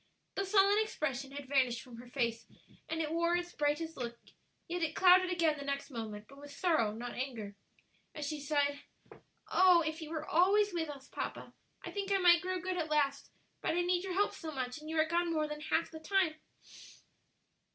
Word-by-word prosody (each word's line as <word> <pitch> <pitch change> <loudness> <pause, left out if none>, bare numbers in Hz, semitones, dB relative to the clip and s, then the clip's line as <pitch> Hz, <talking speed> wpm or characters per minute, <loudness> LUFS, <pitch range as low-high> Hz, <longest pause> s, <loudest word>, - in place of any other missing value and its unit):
The 395 - -1
sullen 400 +1 +5
expression 275 - -2
had 285 0 -6
vanished 255 -4 +1
from 245 -3 -12
her 245 +1 -11
face 235 -3 -2 0.4
and 325 0 -1
it 305 - -3
wore 340 +1 +2
its 350 0 -3
brightest 300 +2 -1
look, 235 -1 -4 0.5
yet 350 +1 -3
it 320 -1 -1
clouded 370 0 +6
again 330 -4 +1
the - - -5
next 280 +1 -3
moment, 215 -3 -6
but 275 +1 -15
with 290 0 -11
sorrow, 285 - +1
not 240 +3 -6
anger, 230 -6 -5 0.6
as 300 -2 -4
she 305 0 -3
sighed, 285 0 0 0.7
"Oh! 365 -2 +6
if 315 +1 -3
you 310 - -6
were 315 -1 -4
always 400 +4 +4
with 325 -3 -2
us, 275 -2 -9
papa, - - -6 0.3
I - - -5
think 400 -1 -3
I 395 - +4
might 350 -2 +6
grow 370 0 -2
good 365 +1 -3
at 320 -2 -2
last; 285 -2 +1 0.3
but - - 0
I 350 - +2
need 355 0 +1
your 380 -1 -3
help 405 +3 +2
so 320 -2 -6
much, 255 -1 -4
and 310 - -9
you 320 0 0
are 315 - +5
gone 340 +1 0
more 310 -2 0
than 300 0 -6
half 325 +2 0
the 320 - -8
time." 370 0 +1
315 Hz, 205 wpm, -33 LUFS, 275-355 Hz, 0.7 s, clouded